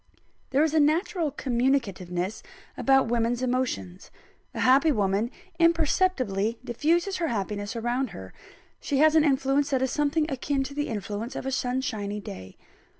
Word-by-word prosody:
There 275 +3 +3
is 315 -1 +1
a 320 - +4
natural 320 +3 +1
communicativeness 220 -9 -1 0.3
about 270 -2 +3
women's 235 +1 0
emotions. 245 - -2 0.5
A - - -2
happy 275 +5 +5
woman 205 -1 +1 0.3
imperceptibly 305 - +2
diffuses 340 - 0
her 335 - -1
happiness 205 -1 -3
around 240 +3 -1
her; 95 - -10 0.5
she 280 - -2
has 310 +2 +5
an 315 -1 +5
influence 275 0 +2
that 265 -2 +1
is 265 - 0
something 300 +1 +1
akin 270 0 -1
to 280 - -7
the 290 +1 -2
influence 210 +2 -4
of - - -5
a 270 - -2
sunshiny 245 -6 -2
day. 95 - -9
260 Hz, 150 wpm, -26 LUFS, 215-290 Hz, 0.5 s, happy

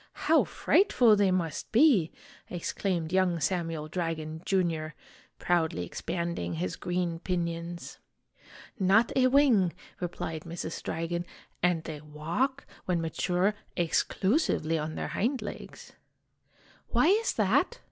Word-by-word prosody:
How - - +5
frightful 250 - +4
they 200 -2 +3
must 170 -5 -2
be!' 230 - +5 0.4
ex 175 -2 -4
claimed 175 -4 -2
young 185 -3 +2
Samuel 165 -3 -1
Dragon, 160 -2 -3
Jr., 165 -5 0 0.4
proudly 160 - 0
expanding 170 - -3
his 90 +3 -2
green 175 -2 -2
pinions. 170 -1 -4 0.8
"Not 200 +5 +4
a 255 -1 +5
wing!" 250 -10 +4 0.3
replied 165 -3 -4
Mrs. 165 0 -6
Dragon. 165 +1 -2 0.4
"And 175 -2 +2
they 155 -3 -7
walk, 165 - -2 0.2
when 180 -2 +1
mature, 180 +4 0 0.2
exclusively 175 - +1
on 155 0 -3
their - - -3
hind 255 +5 0
legs." 205 - -9 1.0
"Why - - +3
is 425 +7 +3
that?" 485 - +2
175 Hz, 115 wpm, -29 LUFS, 160-195 Hz, 1.0 s, How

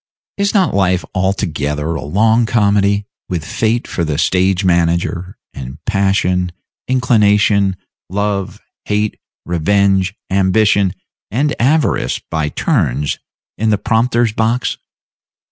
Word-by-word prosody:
Is 200 +1 0
not 190 -4 +3
life 95 -2 +1
altogether 80 -5 -1
a 75 - -4
long 110 +9 +2
comedy, 100 -2 +2 0.2
with 85 -4 -3
Fate 115 +8 -1
for 85 - -2
the 75 -3 -1
stage 95 +3 +1
manager, 85 +1 0 0.2
and 65 +1 -8
Passion, 95 -3 +1 0.4
Inclination, 105 -6 +3 0.3
Love, 100 0 -2 0.3
Hate, 105 0 -1 0.3
Revenge, 95 +2 +1 0.2
Ambition, 100 0 +2 0.3
and 145 +7 0
Avarice, 135 - +1
by 80 -2 0
turns, 75 - 0 0.4
in 110 +1 +1
the 105 - +3
prompter's 115 +1 +1
box? 115 +3 0
100 Hz, 110 wpm, -16 LUFS, 90-110 Hz, 0.4 s, not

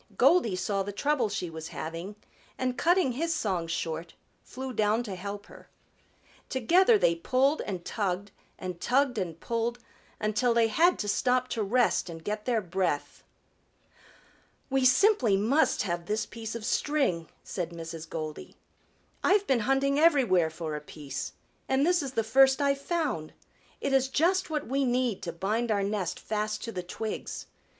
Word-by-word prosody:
Goldy 235 - +4
saw 195 +2 -1
the 200 +1 -3
trouble 255 +1 +1
she 200 -3 -3
was 160 0 -7
having 165 +7 -6 0.4
and 255 -1 -1
cutting 345 -2 +3
his 325 +6 -1
song 190 - -1
short, 165 0 -4 0.3
flew 260 0 -7
down 215 +1 +2
to 210 -5 -6
help 200 +2 -6
her. - - -15 0.8
Together 355 - +4
they 170 - +3
pulled 260 - +1
and 185 -4 -5
tugged 200 -1 -2 0.3
and 180 -2 -6
tugged 255 -2 +2
and 170 -4 -4
pulled, 235 +1 -2 0.4
until 215 +3 +1
they 230 -1 +4
had 340 +10 +4
to 205 - -3
stop 250 +4 +1
to 225 - -2
rest 220 -2 +2
and 165 -1 -8
get 210 +2 -3
their 235 -3 +1
breath. 180 -5 -2 1.5
"We 270 -1 +2
simply 255 - +4
must 245 +10 +2
have 175 -3 -3
this 215 +1 0
piece 225 -1 -7
of 225 -2 -5
string," 260 - 0
said 175 -3 -4
Mrs. 165 -1 -8
Goldy. 155 -2 -6 0.7
"I've 405 +1 +4
been 265 -8 +2
hunting 270 +4 +2
everywhere 245 - +4
for 160 -1 -5
a 150 - -5
piece, 145 -2 -6 0.4
and 265 +2 +3
this 355 0 +3
is 270 -2 -5
the 225 - +1
first 265 +4 +5
I've 280 -1 +1
found. 290 - -2 0.5
It 275 - -1
is 265 -1 +4
just 350 +7 +2
what 300 -2 -2
we 275 +3 0
need 245 -4 0
to 170 - -4
bind 210 +8 -1
our 205 -2 +1
nest 195 -3 -2
fast 215 0 -2
to 230 - -4
the 185 - -4
twigs. 215 +5 -5
220 Hz, 165 wpm, -28 LUFS, 185-270 Hz, 1.5 s, first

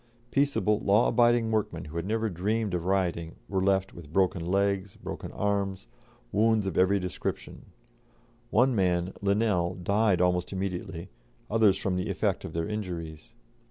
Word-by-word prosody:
Peaceable, 140 -7 +2
law 105 +4 +3
abiding 120 -2 +3
workmen, 95 -6 -1
who 75 - -10
had 85 +2 -3
never 110 +1 0
dreamed 105 +2 -1
of 85 -1 -2
rioting, 85 -3 0
were 95 -1 -1
left 95 0 +1
with 80 -4 -12
broken 90 -1 +1
legs, 100 +1 0
broken - - -7
arms, 100 -1 -1 0.5
wounds 110 0 +3
of 95 -4 -3
every 95 +2 +3
description. 90 -1 -5 0.8
One 125 +2 +3
man, 90 -2 +1
Linnell, 100 -3 +1
died 100 +2 +2
almost 90 0 +1
immediately, 95 -2 -4 0.4
others 105 -3 +4
from 95 -2 -1
the 90 - -2
effect - - -1
of 80 - -7
their 85 0 -2
injuries. 90 -4 -6
95 Hz, 150 wpm, -28 LUFS, 90-105 Hz, 0.8 s, others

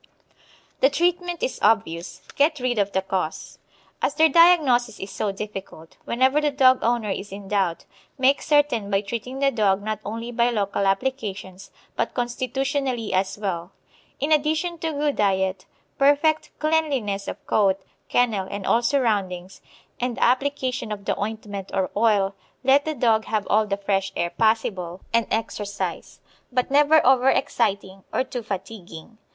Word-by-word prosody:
The 270 - +5
treatment 350 +2 0
is - - -2
obvious 175 -6 0
get 300 +1 +2
rid 250 -3 0
of 200 0 +1
the 190 -1 0
cause. 185 -4 -4 0.4
_As 290 - 0
their 320 +1 +5
diagnosis 280 -9 +4
is 195 +1 -7
so 200 +1 -2
difficult, 195 -5 -8
whenever 260 +5 +2
the 300 - +2
dog 260 -2 +4
owner 230 -3 0
is 195 +1 -5
in 195 0 -8
doubt, 195 -4 -1 0.3
make 270 +1 +3
certain 290 -9 +2
by 195 0 +2
treating 235 +5 -5
the 275 0 +2
dog 200 -4 +1
not 215 0 -3
only 230 +3 -5
by 235 0 +2
local 200 -3 -1
applications 195 -4 -3 0.3
but - - -2
constitutionally 255 -1 -2
as 190 +1 0
well_. 180 -4 -3 0.5
In 290 +3 -1
addition 315 +3 +1
to 325 0 -2
good 290 -1 -1
diet, 190 -2 0 0.3
perfect 290 +3 +3
cleanliness 280 -11 0
of - - -7
coat, 195 -2 +2 0.3
kennel, 220 -6 +1
and 200 -2 -5
all 235 - +3
surroundings, 205 -8 -1 0.4
and 245 -1 -2
the - - +1
application 255 -2 0
of 200 -2 -6
the - - 0
ointment 205 -2 -5
or 190 -1 0
oil, 205 -3 +2 0.3
let 275 +2 +4
the 310 -1 -2
dog 225 -5 +2
have 215 -2 -1
all 215 +1 +3
the 200 -1 -1
fresh 195 -1 -1
air 170 0 -1
possible, 190 -4 0
and 230 -1 +2
exercise, 205 -2 -4 0.3
but 250 +1 0
never 295 +2 +5
over 260 0 +5
exciting 200 -8 -1
or - - +1
too 255 -1 -5
fatiguing. 200 -1 -8
225 Hz, 155 wpm, -23 LUFS, 195-270 Hz, 0.5 s, The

